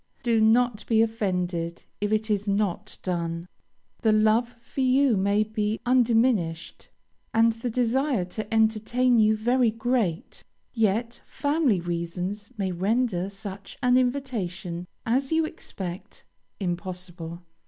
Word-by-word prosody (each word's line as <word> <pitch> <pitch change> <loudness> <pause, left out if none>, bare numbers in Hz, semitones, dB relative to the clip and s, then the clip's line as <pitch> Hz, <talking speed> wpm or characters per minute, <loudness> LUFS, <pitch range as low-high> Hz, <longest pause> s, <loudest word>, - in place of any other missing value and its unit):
Do 230 -2 +3
not 225 0 +3
be 225 -1 +4
offended 180 -6 -2 0.2
if 205 0 0
it 215 0 +1
is 205 0 0
not 205 0 -1
done. 170 -1 -2 0.5
The 220 - +3
love 220 +3 +3
for 235 +3 -5
you 260 -1 +4
may 200 +2 +2
be 215 0 -2
undiminished, 230 -9 +1 0.5
and 230 +1 +5
the 230 +2 -4
desire 250 -2 +1
to 215 +4 -6
entertain 225 +3 +3
you 215 0 +4
very 240 +2 +3
great, 225 -6 -1 0.3
yet 225 +1 0
family 285 - +1
reasons 175 +4 -4
may 190 -2 -1
render 195 0 0
such 200 -1 -8
an 250 0 +4
invitation 210 -10 -1 0.2
as 265 +5 +1
you 320 0 +3
expect, 190 - -7 0.3
impossible. 175 -2 -5
215 Hz, 120 wpm, -26 LUFS, 185-240 Hz, 0.5 s, and